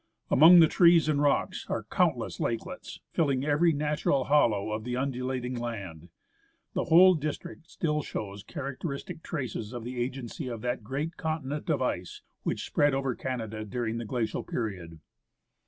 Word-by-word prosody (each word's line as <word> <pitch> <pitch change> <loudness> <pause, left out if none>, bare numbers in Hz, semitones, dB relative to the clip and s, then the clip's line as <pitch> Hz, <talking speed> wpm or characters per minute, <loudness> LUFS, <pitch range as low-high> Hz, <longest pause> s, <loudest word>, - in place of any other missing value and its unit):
Among 170 +5 +9
the 160 - +7
trees 170 -1 +5
and 145 -2 +2
rocks 145 -1 +1
are - - -2
countless - - 0
lakelets, 115 -1 -4
filling 140 -4 +1
every 150 +3 +3
natural 150 -2 0
hollow 115 -8 +2
of 110 0 -3
the 125 +1 -3
undulating 130 -1 -2
land. 100 -9 -6 0.6
The - - -1
whole 185 +3 +7
district 160 +2 -5
still 150 -2 -1
shows 100 -7 -6
characteristic 140 - -6
traces 125 -9 -4
of 120 -2 -5
the 125 +1 -5
agency 130 0 -4
of 115 -3 -5
that 120 -1 -2
great 145 +9 -4
continent 155 -1 -3
of 140 -5 +1
ice 90 -7 -3 0.2
which - - -2
spread 145 -2 +2
over 135 -1 0
Canada 115 -4 -4
during 115 +2 -3
the 115 - -5
glacial 115 0 -2
period. 90 -8 -5
130 Hz, 155 wpm, -28 LUFS, 115-150 Hz, 0.6 s, Among